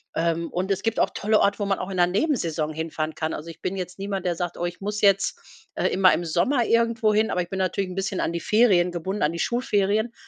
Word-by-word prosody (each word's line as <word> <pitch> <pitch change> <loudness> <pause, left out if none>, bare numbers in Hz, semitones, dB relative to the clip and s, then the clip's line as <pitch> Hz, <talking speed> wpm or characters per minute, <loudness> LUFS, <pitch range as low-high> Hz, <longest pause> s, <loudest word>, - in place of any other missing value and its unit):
Ähm, 165 0 0
und 185 +2 -2
es 195 - 0
gibt 225 -1 0
auch - - +3
tolle 215 +1 +2
Orte, 200 +1 +2
wo 205 - -1
man 195 -1 0
auch 185 - -4
in 190 - -4
'ner 175 - +4
Nebensaison 175 - 0
hinfahren 160 0 -3
kann. 160 0 -3
Also, 165 +2 -6
ich 165 - -11
bin 185 - -2
jetzt 180 0 -6
niemand, 195 -2 -3
der 175 -1 0
sagt: 175 0 -4
„Oh, 175 - -2
ich 175 0 -5
muss 210 +1 -3
jetzt, 195 -1 +3 0.4
äh, - - +1
immer 185 -1 +4
im 175 - -1
Sommer 180 - +1
irgendwohin“, 225 -1 +2
aber 180 - 0
ich 175 - -6
bin 190 - -4
natürlich 190 0 -1
'n 180 - -7
bisschen 195 0 -2
an - - 0
die 170 - -3
Ferien 190 -3 +3
gebunden- 185 +4 -4
an 155 +3 +1
die - - -5
Schulferien. 220 0 0
190 Hz, 255 wpm, -24 LUFS, 175-210 Hz, 0.4 s, ner